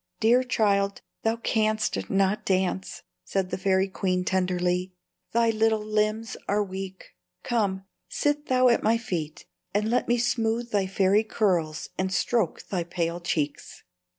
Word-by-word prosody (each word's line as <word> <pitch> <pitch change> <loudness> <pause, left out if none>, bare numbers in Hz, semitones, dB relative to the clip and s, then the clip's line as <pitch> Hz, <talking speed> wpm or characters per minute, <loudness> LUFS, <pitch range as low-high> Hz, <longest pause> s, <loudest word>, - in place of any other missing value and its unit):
"Dear 240 +3 +5
child, 200 -5 +1 0.2
thou 225 0 +1
canst 215 -2 0
not 195 +1 +1
dance," 190 0 -1 0.2
said 190 -2 -2
the 185 - -1
fairy 190 0 +2
queen, 185 -1 -1
tenderly; 180 0 0 0.4
"thy 230 0 +3
little 220 -1 +1
limbs 215 +1 0
are 205 +1 +2
weak. 190 -1 -7 0.3
Come, 195 -5 0 0.2
sit 290 0 0
thou 255 0 +4
at 235 - +3
my 225 +1 +3
feet, 175 -7 -4 0.3
and 210 +2 +1
let 245 - +1
me 240 - +3
smooth 235 0 0
thy 200 -2 +1
fair 195 +2 +3
curls 180 -8 -1
and 185 0 0
stroke 195 -1 0
thy 180 -3 -2
pale 170 0 -2
cheeks." 155 -4 -3
200 Hz, 145 wpm, -26 LUFS, 185-225 Hz, 0.4 s, Dear